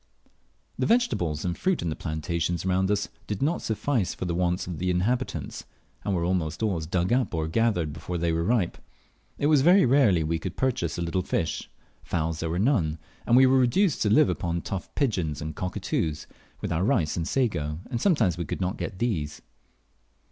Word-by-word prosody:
The - - +1
vegetables 90 - +1
and 90 -1 -1
fruit 185 -2 0
in 85 - -1
the - - -3
plantations 85 +2 -2
around 95 +1 +1
us 105 0 +1 0.2
did 105 -2 -3
not 165 +5 +1
suffice 110 -2 -1
for - - -4
the 85 - -1
wants 90 0 0
of 90 -3 -6
the 90 +1 0
inhabitants, 115 +9 -1 0.4
and 100 - 0
were 85 - 0
almost 85 0 -1
always 85 -8 -1
dug 90 +5 +1
up 125 -7 +1
or 80 -1 -1
gathered 90 -5 +1
before 85 +3 -5
they 85 0 0
were 80 0 0
ripe. 105 -2 +1 0.6
It - - -1
was 150 -2 +5
very 180 +5 +6
rarely 120 - +4
we 80 +1 -1
could 90 +1 -6
purchase 115 -11 0
a 85 - -1
little 85 +2 0
fish; - - -2 0.3
fowls 80 -2 -2
there 80 - -2
were 85 - -1
none; 95 - +2 0.3
and 120 - +5
we 130 - +8
were 130 0 +5
reduced 150 +7 +2
to 105 - +2
live 105 -2 +5
upon 85 -1 -2
tough 95 - -4
pigeons 90 - 0
and 80 -1 -5
cockatoos, 80 -3 -2 0.4
with - - -3
our 85 +2 +1
rice 95 - +1
and 85 -1 -2
sago, 85 - 0
and 120 - -2
sometimes 110 - +2
we 85 - -2
could - - -4
not 95 +2 -1
get 100 - -5
these. 85 -11 -2
90 Hz, 200 wpm, -26 LUFS, 85-120 Hz, 0.6 s, we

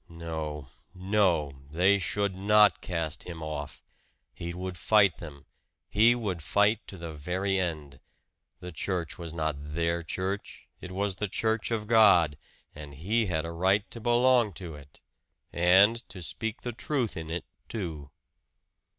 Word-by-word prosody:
No, 80 -4 -5 0.3
no 90 -6 +1 0.2
they 95 +6 +3
should 100 +1 0
not 105 +2 +4
cast 80 -4 -3
him 85 -3 -7
off! 75 -2 -6 0.5
He 85 0 -6
would 90 +1 -5
fight 100 0 +3
them 70 -4 -10 0.4
he 115 +3 +5
would 100 -8 -3
fight 105 +7 +2
to 95 - -9
the 85 -2 -7
very 95 +6 -1
end. 75 -6 -4 0.6
The 90 - -7
church 90 +1 -3
was 85 -2 -6
not 80 -2 -2 0.2
their 85 0 0
church 95 +4 -4
it 90 - -9
was 95 0 -2
the 105 - -1
church 110 +3 0
of 110 -2 -2
God! 105 -9 +5 0.4
And 75 -1 -10
he 105 - 0
had 80 -3 -1
a 85 - -5
right 95 +5 +2
to 115 - -8
belong 120 -2 +3
to 85 -1 -7
it 70 -1 -14 0.5
and 95 +6 +5
to 90 -3 -8
speak 110 +6 -4
the 120 - -3
truth 125 -1 -2
in 80 -1 -6
it, 85 +1 -4 0.2
too! 80 - -5
90 Hz, 150 wpm, -28 LUFS, 80-105 Hz, 0.6 s, he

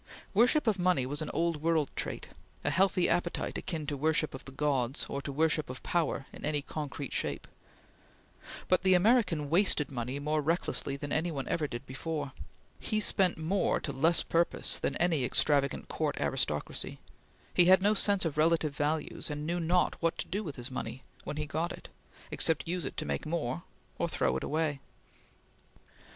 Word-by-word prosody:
Worship 245 +8 +4
of 215 -4 +1
money 175 -7 +2
was 145 +4 -4
an 155 - -3
old 165 +1 0
world 160 -3 +1
trait; - - -4 0.3
a - - +1
healthy 185 -1 +3
appetite 175 0 -1
akin 160 -4 -4
to 145 -1 -2
worship 155 +2 +1
of 135 - -8
the 135 - -9
Gods, 135 -2 0
or 140 - -4
to 140 - -5
worship 155 0 +1
of 125 - -7
power 160 -5 0
in - - -11
any 150 -1 -1
concrete 145 -2 -5
shape; - - -2 1.2
but 185 - +3
the 185 0 +5
American 185 - +3
wasted 160 -3 +3
money 125 +1 -3
more 150 +2 0
recklessly 150 -3 0
than 145 +1 -6
any 160 +3 +1
one 140 -5 -4
ever 155 -3 0
did 120 0 -7
before; 145 +2 -4 0.5
he 215 - -1
spent 190 -4 +2
more 170 +5 +1
to 140 - -4
less 160 +6 +3
purpose 170 +1 +1
than - - -1
any 165 -6 +2
extravagant 140 +2 +2
court 155 -2 -2
aristocracy; 115 - -2 0.5
he 175 - +6
had 190 +1 +6
no 205 +1 +4
sense 200 -2 +3
of 155 -2 -2
relative 160 -2 +2
values, 150 +2 -1
and 150 0 -4
knew 170 +2 -1
not 175 +2 +1
what 165 -1 +1
to - - -3
do 205 +4 -2
with 150 -7 -6
his 125 +1 -6
money 130 0 -5 0.2
when 150 - -4
he 150 - -2
got 160 +4 -2
it, - - -9 0.4
except 160 -1 +3
use 175 -2 -2
it - - -6
to 155 - -2
make - - -3
more, 150 - -2 0.4
or - - 0
throw - - 0
it 65 - -2
away. 155 -2 -1
155 Hz, 185 wpm, -31 LUFS, 140-175 Hz, 1.2 s, he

